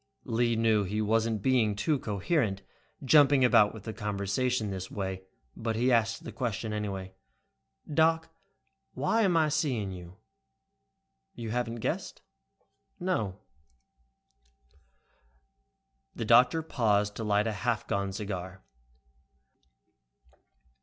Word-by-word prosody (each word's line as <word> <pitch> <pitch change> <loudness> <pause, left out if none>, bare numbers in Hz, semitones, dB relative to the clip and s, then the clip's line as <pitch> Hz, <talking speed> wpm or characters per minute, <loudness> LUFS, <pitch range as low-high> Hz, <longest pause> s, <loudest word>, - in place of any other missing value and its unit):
Lee 115 0 +1
knew 110 -2 +2
he 100 +3 -3
wasn't 110 0 0
being 120 -6 +2
too 145 +7 0
coherent, 105 - -1 0.4
jumping 140 -2 +6
about 105 -3 +5
with 110 -3 -11
the 110 - -5
conversation 105 +3 -1
this 95 -1 -5
way, 95 -2 -4 0.3
but 115 -1 -3
he 125 +3 +2
asked 115 -1 +1
the - - -7
question, 115 -3 -3
anyway. 95 -3 -4 0.8
"Doc, 160 +1 +2 0.6
why 225 +1 +1
am 185 -5 +3
I 155 -1 +3
seeing 130 -10 -1
you?" 90 0 -10 1.2
"You 115 -2 -5
haven't 120 -1 -2
guessed?" - - -3 0.8
"No." 110 - -2 2.7
The 115 - -3
doctor 125 +8 +5
paused 105 -8 +1
to 115 - -4
light 105 0 +2
a 110 - -1
half 120 +1 -1
gone 100 0 -1
cigar. 95 -2 -6
110 Hz, 110 wpm, -29 LUFS, 100-125 Hz, 2.7 s, jumping